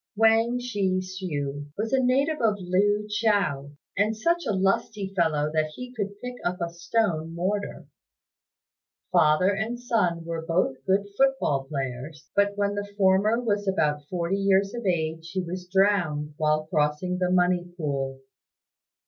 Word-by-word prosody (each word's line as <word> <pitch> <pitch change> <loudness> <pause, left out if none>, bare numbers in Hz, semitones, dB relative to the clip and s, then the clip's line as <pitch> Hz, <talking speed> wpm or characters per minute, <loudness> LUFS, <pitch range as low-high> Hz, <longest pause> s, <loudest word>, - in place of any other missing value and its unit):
Wang 225 +2 +4
Shih 205 -7 0
hsiu 145 -7 -4
was 220 +4 -2
a 265 - +4
native 275 +5 +1
of 215 -3 +2
Lu 205 +3 +1
chou, 200 -10 0 0.2
and 210 +2 +1
such 340 +6 +1
a - - +1
lusty 195 0 0
fellow 155 -4 +1
that 155 -1 +2
he 250 0 -8
could 205 -3 -4
pick 250 0 -5
up 180 +1 -1
a 170 -1 -2
stone 170 -2 -1
mortar. 200 +4 -2 1.3
Father 155 +5 +4
and 225 +3 -3
son 180 -9 0
were 165 -1 -4
both 165 -6 0
good 195 +1 +2
foot 270 +2 +3
ball 135 -2 0
players; 135 +2 -5
but 200 0 +2
when 200 0 +1
the 205 0 -4
former 200 +3 +3
was 205 -4 -1
about 150 -6 +1
forty 180 +1 -1
years 195 0 +2
of 235 -4 -4
age 160 -1 -1
he 185 -1 -1
was 180 +1 -6
drowned 180 -7 +2
while 155 0 +1
crossing 155 +4 0
the 180 -1 +1
Money 180 -1 +2
Pool. 135 -4 -2
185 Hz, 155 wpm, -26 LUFS, 160-210 Hz, 1.3 s, Wang